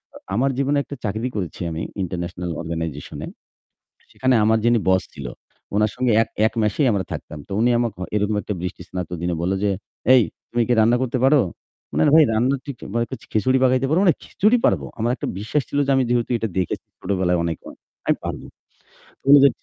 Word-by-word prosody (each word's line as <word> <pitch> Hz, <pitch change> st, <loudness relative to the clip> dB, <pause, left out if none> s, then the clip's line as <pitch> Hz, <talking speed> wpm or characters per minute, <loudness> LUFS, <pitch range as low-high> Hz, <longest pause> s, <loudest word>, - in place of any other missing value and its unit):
আ -, -, -8 dB, 0.2 s
আমার 135 Hz, +4 st, +2 dB
জীবনে 140 Hz, +1 st, +1 dB
একটা 140 Hz, -, -8 dB
চাকরি 110 Hz, +4 st, -1 dB
করেছি 90 Hz, -4 st, -4 dB
আমি 80 Hz, -, -4 dB, 0.2 s
International 90 Hz, 0 st, -4 dB
Organization-এ। 80 Hz, -3 st, -5 dB, 0.9 s
সেখানে 130 Hz, -1 st, +2 dB
আমার 110 Hz, +1 st, +4 dB
যিনি 120 Hz, 0 st, +4 dB
boss 95 Hz, 0 st, +4 dB
ছিল, 70 Hz, -3 st, -6 dB, 0.5 s
উনার 105 Hz, 0 st, +3 dB
সঙ্গে 125 Hz, -2 st, +2 dB
এক, -, -, -4 dB, 0.2 s
এক -, -, -1 dB
মেসেই 120 Hz, +7 st, +2 dB
আমরা 95 Hz, -2 st, 0 dB
থাকতাম। 75 Hz, -, -6 dB
তো -, -, -7 dB
উনি 120 Hz, +1 st, +4 dB
আমাকে 120 Hz, -3 st, 0 dB
হ -, -, -3 dB
এরকম 105 Hz, 0 st, +1 dB
একটা 105 Hz, -, -3 dB
বৃষ্টিস্নাত 90 Hz, 0 st, -5 dB
দিনে 85 Hz, -1 st, 0 dB
বলল 90 Hz, +2 st, 0 dB
যে, 100 Hz, -, +3 dB, 0.4 s
"এই, 125 Hz, -, +7 dB, 0.3 s
তুমি 120 Hz, 0 st, +1 dB
কি -, -, +3 dB
রান্না 115 Hz, +3 st, +4 dB
করতে 130 Hz, 0 st, -1 dB
পারো?" 140 Hz, +2 st, +6 dB, 0.6 s
না, -, -, +4 dB
না -, -, +5 dB
ভাই 160 Hz, -, +8 dB
রান্না 125 Hz, +5 st, +2 dB
ঠিক 140 Hz, -3 st, -5 dB, 0.2 s
মানে 115 Hz, 0 st, +2 dB
খি -, -, -8 dB
খিচুড়ি 130 Hz, +4 st, +3 dB
পাকাইতে 130 Hz, +1 st, +3 dB
পারো? 165 Hz, -, +3 dB
মানে 175 Hz, -, +5 dB
খিচুড়ি 215 Hz, +5 st, +2 dB
পারবো। -, -, +1 dB
আমার 115 Hz, +2 st, 0 dB
একটা -, -, -4 dB
বিশ্বাস 110 Hz, +8 st, 0 dB
ছিল 145 Hz, -, -2 dB
যে -, -, +1 dB
আমি 130 Hz, -, +3 dB
যেহেতু 120 Hz, 0 st, +1 dB
এটা 110 Hz, -, -2 dB
দেখেছি 90 Hz, -, -2 dB
ছোটবেলায় 90 Hz, -2 st, 0 dB
অনেকবার, 80 Hz, -2 st, -5 dB, 0.3 s
আমি -, -, +3 dB
পারবো। -, -, -5 dB, 0.7 s
তো -, -, -43 dB
বলল 140 Hz, +1 st, +9 dB
যে -, -, +9 dB
110 Hz, 200 wpm, -22 LUFS, 90-130 Hz, 0.9 s, বলল